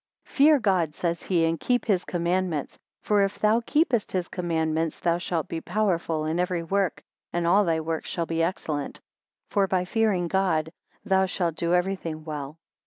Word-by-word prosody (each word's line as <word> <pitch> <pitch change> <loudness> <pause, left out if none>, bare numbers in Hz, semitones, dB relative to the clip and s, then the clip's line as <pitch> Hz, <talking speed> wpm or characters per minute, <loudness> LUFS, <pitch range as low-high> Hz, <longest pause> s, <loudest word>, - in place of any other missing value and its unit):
FEAR 295 +2 +5
God, 185 - +1
says 170 -1 -2
he, 170 -3 +1
and 165 0 0
keep 245 -1 0
his 190 -5 +1
commandments. 175 -3 -1 0.2
For 205 -1 +3
if 195 0 0
thou 215 +2 +3
keepest 255 -6 +1
his 180 -2 -1
commandments 160 -2 -1
thou 170 0 +1
shalt 170 -3 -2
be 165 - -4
powerful 170 -5 0
in 160 +2 -1
every 180 -1 0
work, 195 +1 -1 0.3
and 175 0 -1
all 195 +5 +5
thy 165 -2 +1
works 160 0 -3
shall 170 - -2
be 165 0 -1
excellent. 160 -4 -2 0.5
For 200 -3 +2
by 185 -1 0
fearing 200 -3 +1
God, 165 -4 +1 0.3
thou 190 0 +3
shalt 175 -2 -1
do 170 +2 0
everything 180 -4 -2
well. 150 -1 -6
175 Hz, 175 wpm, -26 LUFS, 165-195 Hz, 0.5 s, FEAR